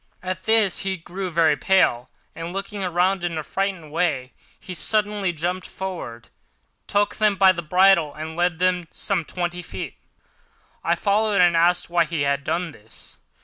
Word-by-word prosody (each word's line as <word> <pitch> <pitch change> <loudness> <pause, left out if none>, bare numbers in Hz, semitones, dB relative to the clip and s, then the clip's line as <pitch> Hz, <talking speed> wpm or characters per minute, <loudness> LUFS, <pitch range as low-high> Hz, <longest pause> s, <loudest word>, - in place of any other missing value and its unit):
At 185 0 -4
this 220 -4 +4
he 190 -1 -2
grew 185 +3 -6
very 160 -3 +3
pale, 130 -10 +2 0.3
and, 165 +1 -6
looking 200 +1 -4
around 180 +1 +1
in 170 -2 -2
a 155 - -3
frightened 190 -4 -3
way, 150 -6 -1 0.3
he 185 - -8
suddenly 205 +1 +1
jumped 175 +3 -3
forward, 170 -12 -7 0.6
took 205 0 +1
them 215 -2 +3
by 190 -1 +6
the 175 -2 -4
bridles 175 -2 +3
and 160 +1 -6
led 175 -1 +1
them 185 +1 +2
on 175 -2 -11
some 190 -4 -1
twenty 175 +2 -4
feet. - - -7 0.9
I - - +2
followed, 210 0 +1
and 175 -1 +5
asked 170 +1 +3
why 170 -1 +3
he 160 -2 -3
had 140 0 0
done 170 +3 -2
this. 110 -4 -16
180 Hz, 170 wpm, -23 LUFS, 165-195 Hz, 0.9 s, by